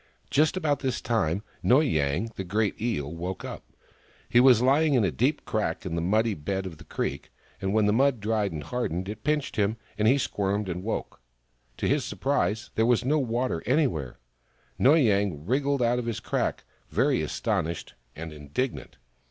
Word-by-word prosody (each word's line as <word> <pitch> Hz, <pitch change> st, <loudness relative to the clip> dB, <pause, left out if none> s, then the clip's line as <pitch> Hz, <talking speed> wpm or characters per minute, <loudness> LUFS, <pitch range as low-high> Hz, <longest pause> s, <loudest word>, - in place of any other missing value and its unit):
Just 155 Hz, +5 st, +3 dB
about 150 Hz, -5 st, +1 dB
this 130 Hz, -3 st, -1 dB
time, 100 Hz, -5 st, 0 dB, 0.2 s
Noy 130 Hz, +5 st, +5 dB
Yang, 80 Hz, -, 0 dB
the 95 Hz, -, -4 dB
great 105 Hz, +3 st, -1 dB
Eel, 75 Hz, -, -1 dB
woke 90 Hz, +3 st, -5 dB
up. -, -, -7 dB, 0.6 s
He 120 Hz, -, +4 dB
was 125 Hz, -2 st, +7 dB
lying 140 Hz, +4 st, +3 dB
in 120 Hz, -, +4 dB
a 95 Hz, -, +1 dB
deep 65 Hz, -, 0 dB
crack -, -, -2 dB
in -, -, -3 dB
the 85 Hz, -, -1 dB
muddy 110 Hz, +5 st, +2 dB
bed 95 Hz, +4 st, -3 dB
of 85 Hz, -4 st, -8 dB
the -, -, -11 dB
creek, 70 Hz, -, -4 dB, 0.3 s
and 95 Hz, 0 st, -1 dB
when 110 Hz, 0 st, +3 dB
the 105 Hz, -, +3 dB
mud 135 Hz, +1 st, +3 dB
dried 105 Hz, -1 st, 0 dB
and 75 Hz, -2 st, -5 dB
hardened 95 Hz, -, -3 dB
it 105 Hz, +1 st, -7 dB
pinched 150 Hz, -1 st, -1 dB
him, 105 Hz, +1 st, +1 dB, 0.2 s
and 105 Hz, -, +3 dB
he 130 Hz, +4 st, +5 dB
squirmed 100 Hz, -5 st, -1 dB
and 90 Hz, 0 st, -3 dB
woke. 110 Hz, -, -4 dB, 0.6 s
To -, -, -1 dB
his -, -, +2 dB
surprise, 120 Hz, -5 st, -1 dB
there 110 Hz, +1 st, +2 dB
was 120 Hz, 0 st, +2 dB
no 150 Hz, +4 st, +3 dB
water 120 Hz, -, -1 dB
any 145 Hz, +5 st, +4 dB
where. 75 Hz, -, -4 dB, 0.6 s
Noy 150 Hz, +5 st, +6 dB
Yang 100 Hz, -, +1 dB
wriggled 140 Hz, +3 st, +1 dB
out 120 Hz, +1 st, +2 dB
of 120 Hz, -, -4 dB
his 115 Hz, -, -2 dB
crack, -, -, -2 dB, 0.3 s
very -, -, +2 dB
astonished 80 Hz, 0 st, -2 dB, 0.2 s
and 80 Hz, 0 st, -7 dB
indignant. 75 Hz, -, -4 dB
110 Hz, 185 wpm, -27 LUFS, 90-130 Hz, 0.6 s, was